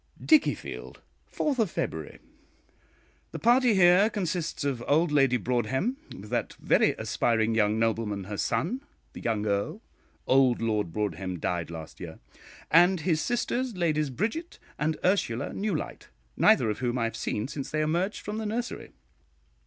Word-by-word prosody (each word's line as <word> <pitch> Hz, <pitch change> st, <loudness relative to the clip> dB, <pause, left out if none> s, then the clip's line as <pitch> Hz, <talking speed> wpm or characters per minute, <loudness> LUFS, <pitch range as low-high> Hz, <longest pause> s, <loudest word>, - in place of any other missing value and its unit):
DICKIEFIELD, 310 Hz, -2 st, +1 dB, 0.3 s
4th 255 Hz, -, 0 dB
February. 80 Hz, -, -4 dB, 1.1 s
The -, -, -6 dB
party 240 Hz, -1 st, +4 dB
here 185 Hz, +3 st, +6 dB
consists 175 Hz, -7 st, -3 dB
of 135 Hz, -4 st, -2 dB
old 155 Hz, +2 st, +3 dB
Lady 135 Hz, -4 st, +4 dB
Broadhem, 125 Hz, -, -1 dB, 0.2 s
with 105 Hz, +2 st, -11 dB
that -, -, -1 dB
very -, -, +2 dB
aspiring 115 Hz, -1 st, 0 dB
young 110 Hz, -1 st, +2 dB
nobleman, 110 Hz, -3 st, 0 dB
her 100 Hz, +2 st, -6 dB
son, 245 Hz, -, -1 dB, 0.3 s
the -, -, -9 dB
young 110 Hz, -3 st, -1 dB
Earl 100 Hz, -1 st, -1 dB, 0.5 s
(old 130 Hz, -2 st, +4 dB
Lord 105 Hz, -6 st, -1 dB
Broadhem 95 Hz, -2 st, -3 dB
died 85 Hz, 0 st, -2 dB
last 80 Hz, -2 st, -9 dB
year), -, -, -8 dB, 0.5 s
and 175 Hz, +2 st, +5 dB
his 160 Hz, -1 st, +1 dB
sisters, 245 Hz, -1 st, -1 dB
Ladies 155 Hz, -4 st, +1 dB
Bridget 220 Hz, -, -3 dB, 0.2 s
and 155 Hz, +1 st, 0 dB
Ursula 180 Hz, -, 0 dB
Newlyte, 200 Hz, -6 st, -3 dB, 0.3 s
neither -, -, +4 dB
of -, -, -5 dB
whom 125 Hz, -1 st, -1 dB
I 120 Hz, -, 0 dB
have 115 Hz, -, -2 dB
seen 105 Hz, +3 st, -2 dB
since 140 Hz, -1 st, -5 dB
they 155 Hz, -, -1 dB
emerged 170 Hz, +7 st, -1 dB
from 210 Hz, +1 st, -4 dB
the 220 Hz, -, -3 dB
nursery. 235 Hz, +3 st, -4 dB
145 Hz, 145 wpm, -27 LUFS, -, 1.1 s, here